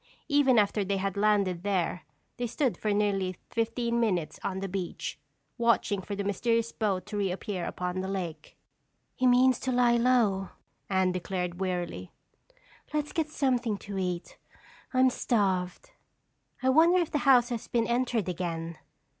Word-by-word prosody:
Even 285 -4 +4
after 205 0 +3
they 195 +1 -1
had 195 0 -2
landed 200 -4 +2
there, 180 -3 -1 0.3
they 245 - -2
stood 255 +1 0
for 215 - -2
nearly 195 -3 0
fifteen 235 +1 0
minutes 185 -9 0
on 190 -1 -2
the 195 - -3
beach, 180 -6 -4 0.4
watching 230 -4 +2
for 200 +2 -5
the 200 - -3
mysterious 230 +3 0
boat 195 -5 -1
to 210 0 -5
reappear 195 -1 -2
upon 180 +1 -3
the 190 - -4
lake. 175 -5 -5 0.6
"He 255 - +1
means 250 0 +5
to 260 - -2
lie 245 -1 +4
low," 230 -6 +2 0.4
Anne 190 -1 +2
declared 180 -1 -3
wearily. 175 - -3 0.8
"Let's 300 -1 -2
get 315 -2 -1
something 250 -8 0
to 200 -1 -6
eat. 180 -2 -4 0.5
I'm 255 0 +4
starved." 195 - -1 0.7
"I 260 - +3
wonder 330 +6 +5
if 340 - -1
the 295 - +1
house 255 -4 +5
has 235 -3 -4
been 230 -1 +1
entered 235 -4 0
again?" 170 -2 -4
205 Hz, 155 wpm, -29 LUFS, 185-245 Hz, 0.8 s, means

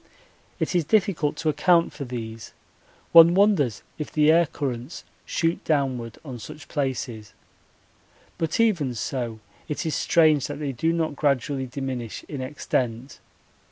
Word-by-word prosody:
It - - -1
is 175 -2 +2
difficult 185 -4 +1
to 160 - -1
account 170 +3 +3
for 140 - -6
these 115 -3 -7 0.6
one 170 +1 +9
wonders 190 - +3 0.2
if 150 - -5
the 150 0 +4
air 170 0 +4
currents 130 0 -5 0.2
shoot 165 0 0
downward 130 -7 -1
on 130 -4 -7
such 150 +4 -10
places; 120 -7 -3 1.1
but 165 +3 -1
even 170 - +2
so 115 -1 -3 0.3
it 150 - -3
is 160 - -1
strange 155 -5 +3
that - - -5
they 145 -2 -3
do 160 +6 0
not 165 -3 -1
gradually 140 -2 0
diminish 125 -3 -5
in 140 -3 -5
extent. 130 -2 -3
145 Hz, 140 wpm, -25 LUFS, 125-165 Hz, 1.1 s, one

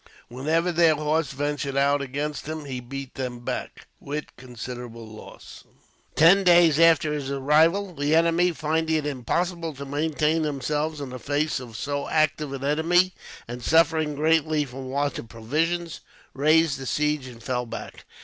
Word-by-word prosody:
Whenever 160 +8 0
their 165 -2 +4
horse 155 -1 0
ventured 140 0 -3
out 140 +1 +3
against 145 +3 -4
him, 155 -1 -5
he 130 -3 -5
beat 135 +2 -7
them 125 -2 -4
back, - - -5
with 150 +2 -6
considerable 120 -2 -8
loss. 110 0 -12 0.5
Ten 180 +5 +6
days 170 -4 +5
after 165 -2 +5
his 145 -3 -4
arrival, 160 +8 +2
the 145 +1 +1
enemy, 170 +2 +3
finding 160 +1 -1
it 155 -2 -1
impossible 165 +5 -2
to 140 +1 -7
maintain 155 +2 0
themselves 150 +1 -2
in 135 -3 -6
the 130 - -7
face 145 +3 -1
of 120 -4 -9
so 145 0 -3
active 155 -2 +1
an 135 -1 -6
enemy, 170 +5 +2 0.3
and 120 +1 -7
suffering 160 +1 +2
greatly 155 0 +2
from 130 0 -8
want 140 +2 -1
of 115 - -10
provisions, 160 +9 -2 0.3
raised 155 0 +3
the 135 - -6
siege 150 -1 0
and 120 -2 -12
fell 125 -1 -2
back. - - -8
150 Hz, 160 wpm, -25 LUFS, 135-160 Hz, 0.5 s, Ten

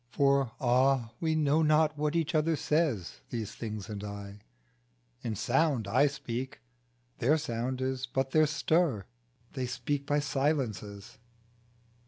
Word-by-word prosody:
For 140 0 +2
ah! 130 -2 +2
we 160 -1 0
know 155 0 +3
not 155 0 +3
what 150 +1 -1
each 165 -2 0
other 160 +1 +2
says 140 - 0
These 110 -3 -4
things 110 -3 -6
and 105 -2 -6
I; 100 0 -7 0.8
in 110 -2 -3
sound 135 - +1
I 130 +8 +4
speak 130 -1 -5 0.6
Their 140 +6 +3
sound 125 -2 -3
is 130 0 -2
but 135 +1 -1
their 155 +1 +4
stir, 155 - +1 0.5
they 130 -2 -2
speak 140 +3 -3
by 145 - +2
silences. 130 -9 -2
135 Hz, 135 wpm, -30 LUFS, 115-150 Hz, 0.8 s, I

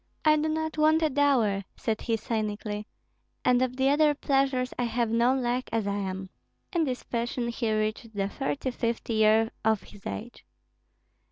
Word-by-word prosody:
"I 305 0 +6
do 305 +1 0
not 315 0 -2
want 315 +1 +4
a 310 - +2
dower," 260 -8 +3
said 220 -1 -2
he, 230 -2 0
cynically; 210 -1 -3 0.6
"and 250 0 +4
of 255 -1 0
the 265 0 +3
other 295 +1 +4
pleasures 270 -2 +1
I 245 - +2
have 235 -1 0
no 235 +3 +3
lack 250 -1 -1
as 225 -2 0
I 200 0 -1
am." 190 -1 -4 0.4
In 335 -3 +2
this 255 -3 -3
fashion 235 0 -2
he 230 -1 -1
reached 215 +1 -2
the 195 -1 0
thirty 270 +3 -2
fifth 235 -1 -2
year 220 0 +4
of 220 -3 +2
his 200 - -11
age. 240 +2 -7
235 Hz, 175 wpm, -28 LUFS, 215-270 Hz, 0.6 s, I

